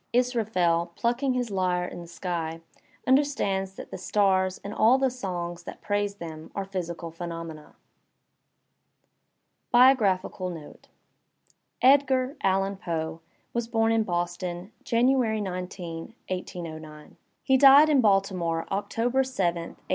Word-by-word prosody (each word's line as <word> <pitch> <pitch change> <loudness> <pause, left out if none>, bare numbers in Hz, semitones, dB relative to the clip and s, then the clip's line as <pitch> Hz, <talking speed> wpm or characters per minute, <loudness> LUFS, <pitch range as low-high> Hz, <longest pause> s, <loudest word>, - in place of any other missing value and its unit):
Israf 240 -4 0
el, 170 -1 +3
plucking 250 +3 0
his 245 -3 -2
lyre 180 -2 0
in 175 - -7
the 170 - -10
sky, 165 -2 -4 0.4
understands 230 -9 +1
that - - -10
the - - -6
stars 190 -1 +1
and 200 - -6
all 230 +4 +5
the 265 -1 +1
songs 175 -7 -5
that - - -9
praise 205 0 -1
them 160 -4 -8
are 195 - -2
physical 170 -3 -5
phenomena. 165 -2 -7 2.0
BIOGBAPHICAL 205 -7 +3
NOTE 160 -4 -10 1.0
Edgar 265 0 +4
(Allan) 195 +1 +1
Poe 160 -3 -4 0.3
was 235 -1 -2
bom 225 -1 +1
in 225 0 +3
Boston, 175 0 -3
January 240 -2 +2
19, 180 -3 -6
1809. 160 -4 -7 0.3
He 265 - +3
died 280 +3 +8
in 290 -4 +4
Baltimore, 190 -6 +1
October 235 +6 0
7, 255 -7 -3
1849. 170 -1 -9
190 Hz, 125 wpm, -26 LUFS, 175-235 Hz, 2.0 s, died